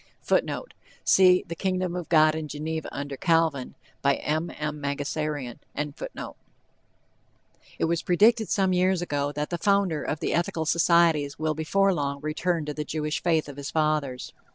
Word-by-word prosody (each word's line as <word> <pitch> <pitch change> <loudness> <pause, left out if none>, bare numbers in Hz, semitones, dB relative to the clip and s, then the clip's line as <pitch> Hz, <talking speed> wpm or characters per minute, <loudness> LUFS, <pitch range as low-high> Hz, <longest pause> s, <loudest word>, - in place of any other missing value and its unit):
[Footnote: - - 0 0.3
See 185 -1 +5
"The 170 - -4
Kingdom 185 0 -1
of 175 -2 -5
God 155 -2 +5
in 155 -1 -4
Geneva 155 +2 -4
Under 140 0 -5
Calvin." 165 -4 +1 0.3
M. 150 +4 0
M. 150 0 -5
Mangasarian.] 145 -2 -3 2.2
It - - +1
was 165 0 0
predicted 220 +5 +3
some 190 -2 +2
years 180 0 +2
ago 145 -3 -1
that 150 +3 -3
the 175 - -2
founder 200 -5 +2
of 150 - -3
the - - -1
Ethical 165 -1 -1
Societies 165 -3 +3
will 155 0 0
before 195 +6 +2
long 140 -3 -2
return 160 +2 -1
to 150 - -4
the 150 - -3
Jewish 150 0 -3
faith 160 -3 +1
of 145 -1 -9
his 140 -1 -5
fathers. 150 -5 -1
155 Hz, 155 wpm, -26 LUFS, 150-175 Hz, 2.2 s, See